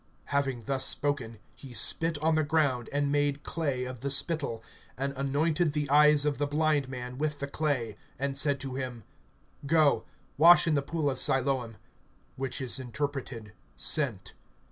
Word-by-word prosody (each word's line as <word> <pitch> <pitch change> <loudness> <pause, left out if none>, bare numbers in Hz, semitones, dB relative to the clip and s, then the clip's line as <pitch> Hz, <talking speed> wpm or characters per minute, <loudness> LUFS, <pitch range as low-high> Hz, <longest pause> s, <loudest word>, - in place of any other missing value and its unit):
(6)Having 135 -5 -1
thus 135 +1 -1
spoken, 135 -6 0 0.2
he 130 -3 -11
spit 165 +4 +2
on 160 +1 +3
the 155 - +2
ground, 145 -6 0
and 145 0 0
made 145 0 0
clay 140 -6 -2
of 130 -1 -7
the 140 - -2
spittle, 140 -5 0 0.3
and 140 +1 -2
anointed 150 +4 0
the 150 -1 -1
eyes 150 0 +5
of 145 -2 -1
the 145 - 0
blind 150 -2 +1
man 125 0 -7
with 150 -1 -1
the 140 - -4
clay, 140 -7 -2 0.2
(7)and 140 0 -2
said 140 0 +2
to 135 -1 -5
him: 125 -3 -5 0.6
Go, 155 -1 +3 0.3
wash 175 +3 +8
in 165 - +1
the 140 - +2
pool 155 +1 -2
of 130 -2 -1
Siloam 130 -4 0 0.6
(which 135 +2 -2
is 130 0 0
interpreted, 130 -4 -5 0.2
Sent). 110 -11 0
140 Hz, 165 wpm, -29 LUFS, 130-150 Hz, 0.6 s, wash